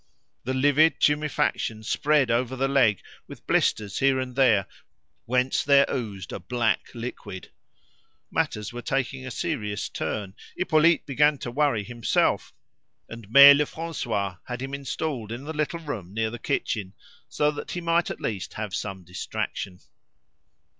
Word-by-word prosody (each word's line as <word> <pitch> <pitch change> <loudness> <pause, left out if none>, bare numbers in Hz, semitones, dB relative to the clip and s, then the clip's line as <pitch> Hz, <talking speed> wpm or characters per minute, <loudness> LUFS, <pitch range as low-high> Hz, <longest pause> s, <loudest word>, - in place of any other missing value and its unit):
The 130 +2 -1
livid 145 +4 +4
tumefaction 150 -7 0
spread 145 +2 +2
over 125 +2 0
the 135 +1 0
leg, 130 -8 +3 0.3
with - - -12
blisters 105 -3 +1
here 135 -1 +3
and 130 -1 -4
there, 115 -8 +4 0.6
whence 125 +2 +1
there 140 -1 +5
oozed 105 -8 -4
a - - -4
black 120 +5 -1
liquid. 115 -5 -7 0.8
Matters 105 +1 -1
were 120 - -6
taking 135 0 -2
a - - -4
serious 105 -3 -3
turn. 100 -3 -4 0.2
Hippolyte 165 -2 +3
began 150 +2 +3
to 120 - -6
worry 140 -5 +1
himself, 120 +1 0 0.6
and 115 -3 -10
Mere 140 +4 +10
Lefrancois, 140 - -2
had 125 -1 -5
him 135 +1 -6
installed 140 -4 -4
in 120 +3 -6
the 155 +2 -5
little 155 +2 -2
room 110 - -6
near 110 0 0
the 120 - -7
kitchen, 110 -7 -2 0.4
so 150 0 +1
that 145 - -7
he 175 - -3
might 170 0 +1
at - - -5
least 100 -4 -4
have 105 -3 -5
some 95 0 -4
distraction. 90 +1 -5
125 Hz, 145 wpm, -25 LUFS, 105-145 Hz, 0.8 s, Mere